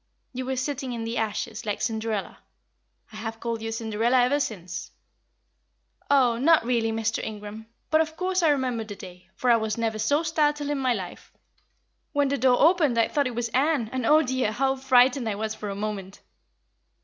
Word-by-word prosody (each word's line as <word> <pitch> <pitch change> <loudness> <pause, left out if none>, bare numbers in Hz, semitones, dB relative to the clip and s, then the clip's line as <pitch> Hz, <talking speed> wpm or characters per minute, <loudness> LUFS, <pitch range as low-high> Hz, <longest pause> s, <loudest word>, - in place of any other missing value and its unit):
You 255 0 -4
were 265 - -1
sitting 260 0 -3
in 230 -1 -4
the 230 +1 -2
ashes, 220 -2 -3
like 210 -2 -3
Cinderella. 220 -3 -3 0.7
I - - -8
have 225 0 -5
called 230 -1 -3
you 225 0 -4
Cinderella 225 +2 0
ever 280 +4 +2
since." 180 -9 -4 1.2
"Oh, 250 -5 +4
not 315 -1 +4
really, 230 -2 +1
Mr. 225 0 -1
Ingram! 215 +1 -7 0.2
But, 315 0 +5
of 320 0 -3
course, 370 0 0
I 325 - +4
remember 255 -5 0
the 210 -2 -8
day, 180 -1 -12
for 250 +3 +2
I 235 - +6
was 220 -1 -2
never 225 -1 -1
so 285 +9 +2
startled 295 -2 0
in 290 - -1
my 255 -2 +1
life. 185 -4 -8 0.8
When 285 -2 +2
the 280 -1 -1
door 250 0 +4
opened 310 -6 +4
I 230 - +3
thought 285 -3 +1
it 245 - -5
was 235 0 -2
Ann, 265 -2 +1
and, 260 -1 -2
oh 310 +1 +6
dear, 255 -4 0
how 265 +4 +1
frightened 260 -2 +3
I 205 - -2
was 215 +1 -3
for 210 -1 -6
a 200 - -4
moment!" 200 -2 -5
240 Hz, 195 wpm, -26 LUFS, 220-275 Hz, 1.2 s, I